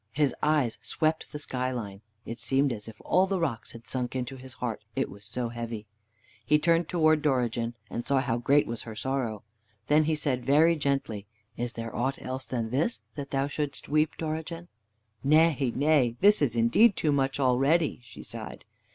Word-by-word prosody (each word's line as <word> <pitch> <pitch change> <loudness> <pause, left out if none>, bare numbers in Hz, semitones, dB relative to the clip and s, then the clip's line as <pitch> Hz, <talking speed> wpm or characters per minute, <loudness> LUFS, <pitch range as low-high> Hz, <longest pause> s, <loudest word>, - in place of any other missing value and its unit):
His 145 -2 +2
eyes 145 -8 +2
swept 155 +6 -1
the 150 - -5
skyline. 125 -8 -3 0.2
It 115 0 -6
seemed 135 +3 +1
as 105 -2 -7
as - - -14
if 110 - -11
all 185 +1 +3
the 190 -1 0
rocks 135 -10 -3
had 115 -1 -12
sunk 125 -1 -3
into 130 +1 -3
his 130 0 -9
heart, 115 -5 -4
it - - -1
was 100 0 -11
so 120 +1 -2
heavy. 115 -2 -5 0.6
He 150 +7 +4
turned 165 +1 +2
towards 155 -3 +3
Dorigen, 120 -5 0
and 120 - -4
saw 140 +1 +2
how 125 -3 0
great 140 +5 +4
was 115 -1 -4
her 110 -2 -8
sorrow. 120 -3 -2 0.4
Then 150 +4 +4
he 160 0 +1
said 135 -5 -1
very 155 +6 +5
gently: 135 -9 -2 0.3
"Is 120 0 -3
there 115 -1 -6
aught 135 +3 -1
else 130 +1 -5
than 115 -3 -2
this, 155 - 0
that 140 -2 -6
thou 135 0 0
shouldst 145 0 -4
weep, 155 +1 +2
Dorigen?" 160 +2 -4 0.5
"Nay, 150 -3 +4
nay, 140 -5 +3
this 205 -2 +6
is 125 -6 +2
indeed 120 - +5
too 155 - +1
much 135 -1 0
already," 140 +5 +2
she 120 0 -12
sighed. 110 -1 -8
135 Hz, 185 wpm, -28 LUFS, 120-150 Hz, 0.6 s, this